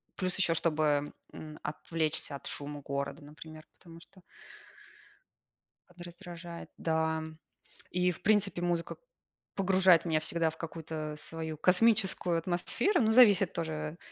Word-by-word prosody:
Плюс 185 -1 -1
еще, 175 -3 +3
чтобы, 150 -3 +1 0.2
м, 155 -1 -9
отвлечься 155 -1 -2
от 140 - -7
шума 145 0 -4
города, 140 +2 -4
например, 155 +1 -12
потому 165 -2 -14
что 185 +2 -18 1.7
подраздражает, 175 -1 -10
да. 160 -1 0 0.7
И, 180 0 +2
в 170 - -10
принципе, 205 -4 +2
музыка 175 -1 -1 0.6
погружает 185 -3 +4
меня 160 -2 +1
всегда 165 +1 0
в 160 - -11
какую-то 160 -2 -6
свою 160 0 -6
космическую 190 -1 +3
атмосферу, 175 - +1
ну, 220 -1 +3
зависит 205 -6 +6
тоже, 155 -1 -4
165 Hz, 120 wpm, -31 LUFS, 155-180 Hz, 1.7 s, зависит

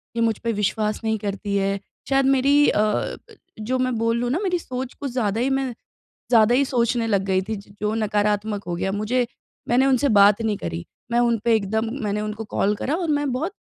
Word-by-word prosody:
ये 230 - 0
मुझ 225 -2 +2
पे 230 - -1
विश्वास 210 +1 -1
नहीं 220 0 0
करती 200 0 -3
है। 195 0 0 0.3
शायद 270 0 +3
मेरी 275 +2 +4
अ - - +1
अ, - - +5
ब 215 -1 -1 0.5
जो 255 +3 0
मैं 255 0 +1
बोल 230 +1 +1
लूँ 245 0 -1
ना 320 - 0
मेरी 365 -2 +1
सोच 255 -4 -5
कुछ 280 -2 -6
ज़्यादा 225 -3 0
ही 260 - +1
मैं 270 0 0 0.6
ज़्यादा 230 0 +5
ही 280 +2 +3
सोचने 240 -2 0
लग 200 -3 +1
गई 190 -1 +1
थी 220 +3 -4
ज 200 0 -11
जो 210 0 0
नकारात्मक 210 -1 0
हो 175 - -2
गया 190 +2 -2
मुझे 215 +5 0 0.5
मैंने 250 +3 +4
उनसे 270 +1 +3
बात 200 +2 +6
नहीं 220 -2 0
करी। 85 - -5 0.3
मैं 235 - +3
उन 235 -1 +3
पे 230 - +4
एकदम 220 +2 -1
मैंने 210 0 -1
उनको 215 +1 -4
कॉल 205 +1 +2
करा 280 +8 -2
और 330 - -2
मैं 290 -2 -1
बहुत 320 +10 -2
225 Hz, 225 wpm, -23 LUFS, 205-255 Hz, 0.6 s, बात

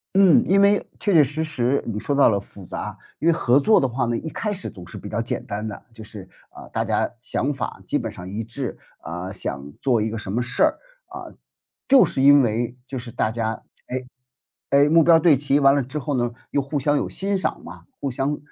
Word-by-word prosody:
嗯， 190 -5 +6
因 195 +3 +3
为 200 +1 +4
确 205 - 0
确 160 -3 +7
实 150 +4 -3
实 140 -4 0
你 110 -3 -3
说 145 - -2
到 140 0 +5
了 105 - +3
复 100 -1 -12
杂。 - - -6 0.2
因 160 - 0
为 - - +5
合 130 -5 +3
作 215 +10 +4
的 135 - +1
话 125 +1 -1
呢， 120 0 -1
一 160 - -5
开 210 +6 -3
始 195 -2 -5
总 90 -5 -12
是 90 - -10
比 - - -8
较 105 +2 -2
简 115 - -4
单 105 +2 -4
的。 105 -2 -6
就 110 -1 -11
是， 105 -3 -10 0.2
啊， - - -12
大 - - -2
家 - - 0
想 140 +3 -1
法 125 -7 -5
基 - - +1
本 115 -5 -4
上 90 -3 -9
一 105 +4 -4
致， 120 +3 -5 0.2
啊， 90 +3 -6
想 70 -7 -6
做 125 -5 +2
一 110 - -1
个 115 - -4
什 105 - -7
么 115 +5 0
事 125 +1 0
儿， - - +3 0.3
啊， - - -9 0.6
就 270 -1 +7
是 130 - -1
因 140 +1 +7
为 120 +1 -1
就 130 -1 -5
是 120 0 -9
大 110 -1 -1
家 110 -1 -3 0.2
哎 130 +1 -3 0.7
哎， 140 +1 +5
目 165 +1 +6
标 165 +1 +6
对 160 -3 +5
齐 145 +1 +1
完 135 0 +6
了 140 - +2
之 130 +4 -6
后 145 0 -3
呢， 120 0 +1 0.2
又 140 - +1
互 140 +2 -3
相 145 +2 +1
有 - - -1
欣 195 +1 -2
赏 170 -4 -3
嘛， 85 0 -11 0.2
互 140 - -2
相 135 +4 -1
130 Hz, 260 characters per minute, -23 LUFS, 110-145 Hz, 0.7 s, 确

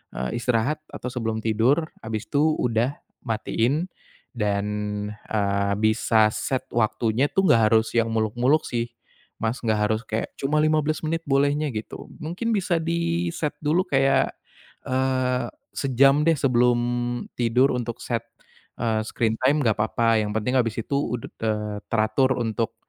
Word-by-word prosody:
eee, 65 0 -3
istirahat 120 +5 0
atau 125 - -6
sebelum 110 -3 -3
tidur, 120 +9 +2
abis 110 0 -4
itu 155 +2 +3
udah, 120 +3 0 0.3
matiin 120 +8 0 0.5
dan, 100 -3 0 0.6
eee, 100 -1 +1
bisa 110 0 +4
set 130 -1 -2
waktunya 115 +2 +1
itu 195 - +2
nggak 115 -10 +5
harus 110 0 +3
yang 115 -1 +3
muluk-muluk 120 +7 +2
sih, 120 0 -2 0.5
Mas, 115 +3 -1
enggak 110 -2 +1
harus 110 0 0
kayak 110 +1 -3
cuma 145 +3 +1
15 155 0 +1
menit 165 +1 -1
bolehnya 145 +2 +2
gitu. 110 - -6 0.2
Mungkin 180 +9 -2
bisa 180 -4 +1
diset 170 -1 -1
dulu 160 +5 +2
kayak, 135 0 +3 0.6
eee, 130 -1 0 0.3
sejam 140 +2 +4
deh 165 - +5
sebelum 125 -2 +3 0.6
tidur 125 +3 +3
untuk 120 -1 -4
set, 115 -2 -2 0.6
eee, 110 -2 +1
screen 110 -1 0
time 140 +3 +3
enggak 110 -4 +2
apa-apa 115 +1 +2
yang 105 - -3
penting 110 +4 0
habis 115 -2 0
itu 140 - -3
ud 120 -4 -3 0.2
eee, 105 -1 -2
teratur 115 +4 +2
untuk, 115 -1 -2
120 Hz, 140 wpm, -24 LUFS, 110-145 Hz, 0.6 s, nggak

